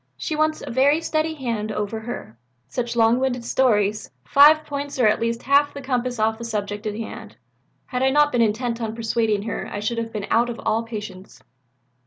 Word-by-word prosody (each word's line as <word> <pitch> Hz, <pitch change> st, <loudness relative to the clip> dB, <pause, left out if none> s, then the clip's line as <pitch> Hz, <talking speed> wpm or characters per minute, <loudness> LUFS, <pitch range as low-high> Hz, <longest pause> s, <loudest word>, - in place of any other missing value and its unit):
She 310 Hz, -, -3 dB
wants 310 Hz, 0 st, 0 dB
a -, -, -6 dB
very 275 Hz, +5 st, +3 dB
steady 320 Hz, -1 st, -1 dB
hand 230 Hz, -6 st, -3 dB
over 210 Hz, +1 st, -3 dB
her. 220 Hz, -, -7 dB, 0.3 s
Such 240 Hz, -, -3 dB
long 230 Hz, +1 st, +4 dB
winded 250 Hz, -2 st, -1 dB
stories 215 Hz, -6 st, +1 dB, 0.2 s
5 305 Hz, -, +6 dB
points 285 Hz, -1 st, -5 dB
or 250 Hz, -, +3 dB
at 215 Hz, 0 st, +3 dB
least 230 Hz, +1 st, -2 dB
half 285 Hz, +1 st, +3 dB
the 280 Hz, -, -6 dB
compass 250 Hz, -1 st, -1 dB
off 220 Hz, +1 st, 0 dB
the -, -, -6 dB
subject 210 Hz, -1 st, -3 dB
in 210 Hz, 0 st, -3 dB
hand. 225 Hz, -, -8 dB, 0.5 s
Had 250 Hz, -1 st, -3 dB
I 265 Hz, -, +4 dB
not 295 Hz, +2 st, +4 dB
been 240 Hz, -, +2 dB
intent 230 Hz, +2 st, 0 dB
on 220 Hz, -1 st, -3 dB
persuading 225 Hz, -2 st, 0 dB
her 225 Hz, -, -4 dB
I 205 Hz, -, -4 dB
should 230 Hz, +3 st, -2 dB
have 230 Hz, 0 st, -4 dB
been 210 Hz, -3 st, -4 dB
out 240 Hz, +1 st, +3 dB
of 235 Hz, -, -6 dB
all 225 Hz, -, +2 dB
patience." 210 Hz, -4 st, -8 dB
235 Hz, 205 wpm, -23 LUFS, 215-265 Hz, 0.5 s, 5